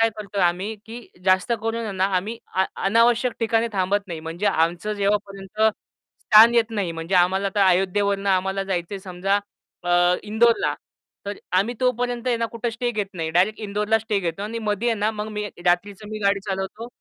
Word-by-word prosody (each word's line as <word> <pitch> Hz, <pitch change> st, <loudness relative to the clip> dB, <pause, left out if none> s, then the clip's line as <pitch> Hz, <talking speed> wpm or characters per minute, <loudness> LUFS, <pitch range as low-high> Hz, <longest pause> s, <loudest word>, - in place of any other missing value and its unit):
काय 225 Hz, 0 st, +4 dB
करतोय 200 Hz, -2 st, -3 dB
आम्ही, 180 Hz, +5 st, 0 dB
की 235 Hz, +1 st, -9 dB, 0.2 s
जास्त 185 Hz, +4 st, +3 dB
करून 225 Hz, -2 st, -2 dB
ना 185 Hz, -, +2 dB
आम्ही 215 Hz, +6 st, -3 dB, 0.2 s
आ 190 Hz, -, +3 dB, 0.2 s
अनावश्यक 230 Hz, +4 st, +3 dB
ठिकाणी 225 Hz, 0 st, +1 dB
थांबत 200 Hz, +1 st, 0 dB
नाही. 165 Hz, -2 st, -5 dB
म्हणजे 165 Hz, +5 st, -4 dB
आमचं 175 Hz, +2 st, +1 dB
जेव्हापर्यंत 200 Hz, 0 st, -2 dB, 0.6 s
स्थान 225 Hz, +2 st, +7 dB
येत 230 Hz, -1 st, +3 dB
नाही. 200 Hz, -6 st, -2 dB
म्हणजे 165 Hz, +3 st, -4 dB
आम्हाला 190 Hz, +3 st, +3 dB
तर 205 Hz, -, +1 dB
अयोध्येवरून 195 Hz, +2 st, +1 dB
आम्हाला 190 Hz, 0 st, +1 dB
जायचंय 190 Hz, 0 st, -3 dB
समजा 190 Hz, +1 st, -1 dB, 0.5 s
अ, 175 Hz, 0 st, +4 dB
इंदोरला 225 Hz, +2 st, +2 dB, 0.5 s
तर 205 Hz, 0 st, -4 dB, 0.2 s
आम्ही 220 Hz, +6 st, 0 dB
तोपर्यंत 245 Hz, -1 st, 0 dB
आहे 245 Hz, -2 st, +2 dB
ना 230 Hz, 0 st, -1 dB
कुठे 235 Hz, 0 st, -2 dB
स्टे 240 Hz, +2 st, -2 dB
घेत 210 Hz, -3 st, -2 dB
नाही. 165 Hz, -2 st, -3 dB
डायरेक्ट 190 Hz, +7 st, +2 dB
इंदोरला 210 Hz, +1 st, 0 dB
स्टे 215 Hz, -2 st, -1 dB
घेतो 175 Hz, +2 st, -3 dB
आणि 225 Hz, +2 st, -4 dB
मध्ये 215 Hz, +1 st, -1 dB
आहे 225 Hz, -2 st, 0 dB
ना 210 Hz, +2 st, +1 dB
मग 215 Hz, 0 st, -5 dB
मी 210 Hz, 0 st, -3 dB, 0.2 s
रात्रीचं 200 Hz, +4 st, 0 dB
मी 215 Hz, -, -4 dB
गाडी 200 Hz, 0 st, +2 dB
चालवतो. 195 Hz, +4 st, -4 dB
205 Hz, 180 wpm, -23 LUFS, 190-225 Hz, 0.6 s, स्थान